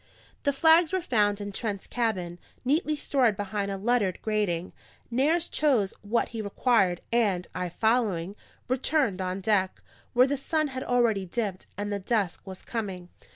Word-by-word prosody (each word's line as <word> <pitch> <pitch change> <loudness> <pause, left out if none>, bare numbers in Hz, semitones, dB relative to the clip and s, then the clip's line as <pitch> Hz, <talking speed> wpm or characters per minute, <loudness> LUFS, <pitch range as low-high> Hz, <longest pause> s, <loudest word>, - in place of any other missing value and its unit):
The 285 - +2
flags 320 +3 +5
were 375 -1 0
found 205 - +2
in 205 0 -5
Trent's 200 -1 -3
cabin, 185 -8 -2 0.3
neatly 305 +3 +1
stored 255 -7 +1
behind 200 0 -2
a 195 - -3
lettered 205 -3 +1
grating; 200 -5 -1 0.4
Nares 310 +8 +2
chose 255 -11 +2
what 220 +3 0
he 225 -1 -4
required 200 -3 +2
and 200 -7 +2
(I 180 -1 -3
following) 205 -3 0 0.3
returned 255 -5 +1
on 185 +1 -3
deck, 190 -2 +1 0.3
where 250 +1 +6
the 280 +1 -1
sun 310 +2 0
had 260 -1 -5
already 230 -6 +1
dipped, 200 -1 -3
and 205 0 -2
the 200 - -2
dusk 200 -2 -1
was 190 -1 -8
coming. 190 -6 -5
215 Hz, 155 wpm, -27 LUFS, 190-255 Hz, 0.4 s, where